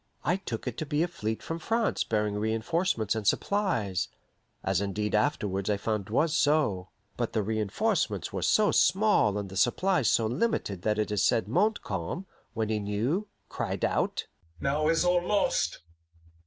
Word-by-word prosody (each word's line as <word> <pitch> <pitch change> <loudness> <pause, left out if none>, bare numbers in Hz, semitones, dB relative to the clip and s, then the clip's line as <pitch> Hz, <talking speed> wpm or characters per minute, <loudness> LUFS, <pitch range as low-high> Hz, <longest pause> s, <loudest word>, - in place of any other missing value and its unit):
I 175 - +2
took 120 - -5
it 125 - -4
to 155 - -2
be 150 +3 +1
a - - 0
fleet 110 -11 -4
from 165 +1 -4
France 225 +6 0
bearing 105 -1 0
re 110 +2 0
enforcements 115 - 0
and 110 -3 -3
supplies 115 - +1 0.6
as - - +1
indeed 105 +1 -2
afterwards 105 -5 0
I 105 - +2
found 105 -1 -2
was 150 +8 +2
so; 145 - +2 0.3
but 120 -2 -2
the 110 - +1
re 110 +2 -1
enforcements 105 -3 -1
were - - -2
so 215 -1 +3
small 190 - +3
and 100 -1 -3
the 95 - -10
supplies 140 - +2
so 115 - +3
limited 120 - -1
that 105 +2 0
it 105 0 -1
is 105 -2 +1
said 110 -2 +2
Montcalm, 180 - -1 0.3
when 110 -1 -1
he 110 -1 0
knew, 115 - -1 0.2
cried - - -2
out, - - 0 0.3
"Now 150 +2 0
is 165 +2 +3
all 180 0 +3
lost! 185 - +1
115 Hz, 170 wpm, -28 LUFS, 105-170 Hz, 0.6 s, so